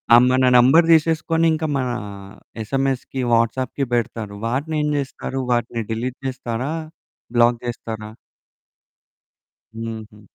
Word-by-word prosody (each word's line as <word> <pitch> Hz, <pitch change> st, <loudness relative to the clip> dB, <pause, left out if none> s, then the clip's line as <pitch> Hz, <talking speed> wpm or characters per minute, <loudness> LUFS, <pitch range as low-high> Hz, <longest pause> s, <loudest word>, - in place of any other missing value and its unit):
ఆహ్, 120 Hz, -, +7 dB
మన 130 Hz, 0 st, +3 dB
నెంబర్ 135 Hz, +8 st, +6 dB
తీసేసుకొని 165 Hz, +1 st, +2 dB
ఇంకా 160 Hz, 0 st, -1 dB
మనా 125 Hz, -2 st, -1 dB, 0.7 s
ఎస్ఎంఎస్‌కి 135 Hz, +2 st, -2 dB
వాట్సాప్‌కి 120 Hz, +4 st, +1 dB
పెడతారు. 115 Hz, -3 st, -2 dB
వాటినేం 150 Hz, +4 st, -1 dB
జేస్తరు? 135 Hz, -1 st, -4 dB
వాటిని 120 Hz, -1 st, 0 dB
డిలీట్ 120 Hz, +3 st, -3 dB
జేస్తరా? 125 Hz, +1 st, -3 dB, 0.6 s
బ్లాక్ 120 Hz, 0 st, +4 dB
జేస్తరా? 110 Hz, -2 st, -5 dB, 1.7 s
హుహు. 110 Hz, -2 st, -7 dB
125 Hz, 100 wpm, -21 LUFS, 115-135 Hz, 1.7 s, ఆహ్